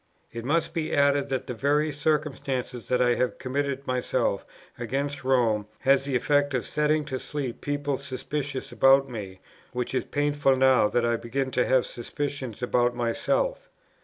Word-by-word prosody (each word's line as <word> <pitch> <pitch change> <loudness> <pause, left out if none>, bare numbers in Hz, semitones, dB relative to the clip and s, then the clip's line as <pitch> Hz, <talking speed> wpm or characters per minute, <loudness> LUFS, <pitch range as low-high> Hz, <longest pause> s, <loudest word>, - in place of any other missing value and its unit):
It 115 0 -5
must 160 +5 0
be 160 -2 -1
added, 140 0 +3
that 130 -1 -2
the 125 - -4
very 145 +5 +1
circumstance 145 -4 -1
that 125 0 0
I 120 0 +4
have 125 +1 -1
committed 140 +1 -2
myself 125 0 -1 0.3
against 135 +4 -3
Rome 115 -5 +2
has 135 +1 +3
the 140 -2 -1
effect 145 +2 +2
of 125 - -1
setting 150 0 +1
to 130 -3 -4
sleep 135 -5 -5
people 145 -1 -2
suspicious 135 0 -4
about 135 +3 +5
me, 100 -7 -7 0.3
which 125 0 -3
is 130 - +1
painful 145 -2 +1
now 130 -4 +5
that 120 +2 +1
I 120 0 +1
begin 130 +3 -3
to 125 0 +1
have 130 -1 +3
suspicions 130 -1 -5
about 120 0 +2
myself. - - -1
135 Hz, 160 wpm, -26 LUFS, 125-145 Hz, 0.3 s, about